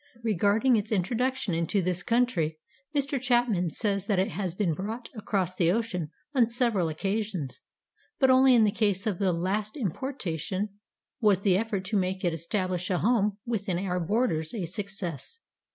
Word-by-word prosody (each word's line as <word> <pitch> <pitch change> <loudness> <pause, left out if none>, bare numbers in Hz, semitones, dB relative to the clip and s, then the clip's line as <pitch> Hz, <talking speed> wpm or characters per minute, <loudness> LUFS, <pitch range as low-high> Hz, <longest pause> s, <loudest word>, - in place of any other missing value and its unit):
Regarding 215 +4 +3
its 215 +1 -3
introduction 230 +2 0
into 165 +4 +1
this 180 -1 0
country, 205 -10 +1 0.4
Mr. 275 -2 0
Chapman 240 -8 +2
says 200 +2 -1
that 205 - +2
it 190 +4 +2
has 190 -5 -3
been 185 -5 +1
brought 220 +8 -5
across 195 -4 -1
the 170 -2 +2
ocean 195 -7 -1 0.2
on 245 -5 +4
several 230 -7 +1
occasions, 185 - -3 0.6
but 265 -1 +5
only 260 0 +6
in 230 - +6
the 210 - +3
case 200 -2 0
of 205 -5 -1
the 195 -2 +2
last 200 - -2
importation 205 - -3 0.5
was 205 -4 +3
the 195 -3 +3
effort 205 -2 -1
to 205 +2 0
make 185 0 -1
it 175 - +1
establish 180 +2 -2
a 185 - +1
home 210 -1 +2
within 200 -6 -1
our 180 -1 -1
borders 175 -3 0
a 195 -6 -2
success. 195 - -6
200 Hz, 165 wpm, -28 LUFS, 180-225 Hz, 0.6 s, only